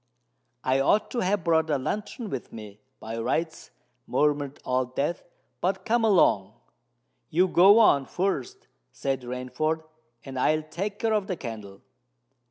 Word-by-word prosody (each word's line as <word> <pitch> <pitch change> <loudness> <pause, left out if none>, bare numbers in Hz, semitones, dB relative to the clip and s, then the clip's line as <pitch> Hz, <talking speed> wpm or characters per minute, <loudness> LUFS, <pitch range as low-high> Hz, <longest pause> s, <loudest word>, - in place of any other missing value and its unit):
"I 130 +1 +2
ought 205 +10 +2
to 245 - -2
have 190 -2 0
brought 160 -1 +2
a 145 - +2
lantern 205 - -4
with 135 - -5
me, 105 -2 -10 0.2
by 115 +1 -6
rights," 160 +7 -2 0.4
murmured 145 -1 0
Old 130 0 -1
Death. 150 +5 -1 0.4
"But 190 +1 -1
come 235 +1 +2
along." 110 - +3 0.8
"You 180 +4 +3
go 190 +4 +6
on 140 -12 +5
first," 180 -9 -3 0.2
said 135 +1 -2
Rainford; 125 +6 -3 0.4
"and 135 -1 -5
I'll 155 +4 +2
take 195 +7 -4
care 225 0 0
of 210 -2 0
the 185 - -3
candle." 105 -6 -8
155 Hz, 145 wpm, -26 LUFS, 130-190 Hz, 0.8 s, go